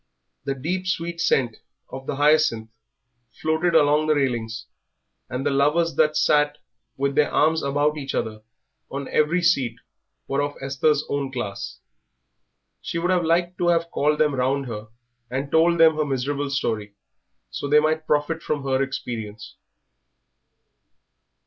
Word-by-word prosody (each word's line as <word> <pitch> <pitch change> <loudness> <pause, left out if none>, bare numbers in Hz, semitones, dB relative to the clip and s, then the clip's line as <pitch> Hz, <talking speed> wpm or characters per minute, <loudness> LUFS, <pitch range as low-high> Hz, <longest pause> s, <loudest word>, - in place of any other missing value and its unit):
The 135 - -1
deep, 180 +8 -3
sweet 170 -2 -2
scent 120 -8 +1 0.3
of 130 0 -8
the - - -2
hyacinth 145 -6 +3 0.7
floated 160 +2 +1
along 150 0 +4
the 155 - +3
railings, 120 -5 -1 0.6
and 125 +2 -4
the 145 - +2
lovers 150 +4 +2
that 155 -1 +3
sat 150 0 +3 0.4
with 140 +1 0
their 150 +1 +3
arms 160 +1 +3
about 145 +2 +1
each 135 -1 -4
other 110 -1 -3 0.5
on 140 0 -5
every 165 +4 +2
seat 135 -9 +2 0.5
were 140 +1 0
of 145 0 -2
Esther's 140 +2 +1
own 140 -1 -2
class. 100 - -5 1.0
She - - -4
would 175 +2 0
have 180 -2 +2
liked 175 +2 +1
to 175 - +1
have 170 -1 +2
called 150 +1 +1
them 150 -1 +2
round 135 +1 0
her 110 -3 -6 0.4
and 135 +3 -3
told 170 +1 +4
them 160 -1 +6
her 155 - +1
miserable 140 +1 -2
story, 110 -7 -2 0.6
so - - -4
that 145 - +2
they - - +9
might 155 +1 0
profit 150 +2 0
by 155 - +3
her 135 -2 -1
experience. 110 -6 -5
145 Hz, 150 wpm, -23 LUFS, 135-160 Hz, 1.0 s, they